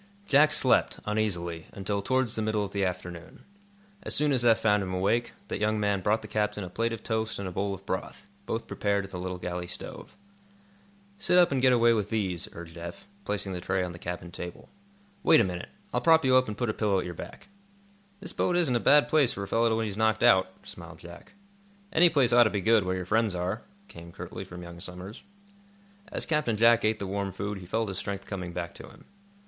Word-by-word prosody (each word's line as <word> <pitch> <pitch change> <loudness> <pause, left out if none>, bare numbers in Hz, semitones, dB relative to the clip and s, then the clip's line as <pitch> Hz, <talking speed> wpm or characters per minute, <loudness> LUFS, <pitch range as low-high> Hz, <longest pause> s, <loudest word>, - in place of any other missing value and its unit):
Jack 150 -2 +5
slept, 130 -4 +3
uneasily, 90 -6 -2
until 100 +1 -2
towards 130 +1 0
the 110 - -2
middle 110 -1 0
of 100 - -5
the 100 -1 -1
afternoon. 90 -2 -5 0.6
As - - -2
soon 150 0 +2
as 125 -3 +1
Eph 115 -2 +5
found 105 -2 +2
him 95 -1 -3
awake, 110 +6 0
that - - -4
young 110 0 +1
man 100 -2 +1
brought 105 +3 +1
the - - -7
captain 105 0 -1
a 90 - -7
plate 115 +4 -1
of 115 -1 -6
toast 110 -1 -2
and 100 - -4
a - - -5
bowl 100 +3 -2
of 95 +1 -15
broth, 95 +1 -5 0.2
both 115 - -2
prepared 100 -1 -1
at 95 - -12
the 90 - -5
little 90 0 -4
galley 90 0 -4
stove. - - -8 1.0
"Sit 180 - +3
up 175 -3 +6
and 135 -2 +1
get 130 0 +5
away 120 -1 +5
with 105 -2 -1
these," 95 -6 -2
urged 85 0 -10
Eph, 85 - -8 0.2
placing 100 -2 -3
the 90 - -4
tray 95 +1 0
on 90 - -4
the 85 - -10
cabin 85 0 -6
table. 90 0 -8 0.5
"Wait 165 -4 +6
a - - +5
minute. 90 -1 -4 0.2
I'll - - +1
prop 160 -2 +5
you 130 -1 +5
up 130 0 +4
and 105 -1 -5
put 120 -3 0
a - - -8
pillow 105 -3 +1
at 95 - -1
your 90 - -5
back." 85 - -10 0.7
"This 185 -3 -6
boat 175 - +1
isn't 155 -8 +2
a - - +3
bad 145 +4 +5
place 145 -6 +3
for 100 - -5
a - - -6
fellow 115 +2 +2
when 115 - 0
he's 105 -2 -5
knocked 110 0 +2
out," 95 -7 +5
smiled 85 -1 -11
Jack. 85 - -13 0.6
"Any 175 +1 +6
place 135 -7 +3
ought 120 0 +7
to - - +3
be 100 - -2
good, 110 -1 +4
where 90 0 -1
your 90 -1 -4
friends 110 0 +1
are," 90 +5 -2 0.3
came, 85 0 -12
curtly, 90 +1 -7
from 90 -1 -9
young 85 0 -10
Somers. 90 +6 -8 0.9
As - - -2
Captain 150 -8 0
Jack 115 +1 +5
ate 110 0 +2
the 100 - -5
warm 100 0 -2
food 100 +1 -4
he 90 - -11
felt 110 +3 -1
his 95 -1 -3
strength 100 0 -4
coming 90 -3 -5
back 85 -1 -5
to - - -11
him. - - -17
105 Hz, 230 wpm, -28 LUFS, 90-115 Hz, 1.0 s, ought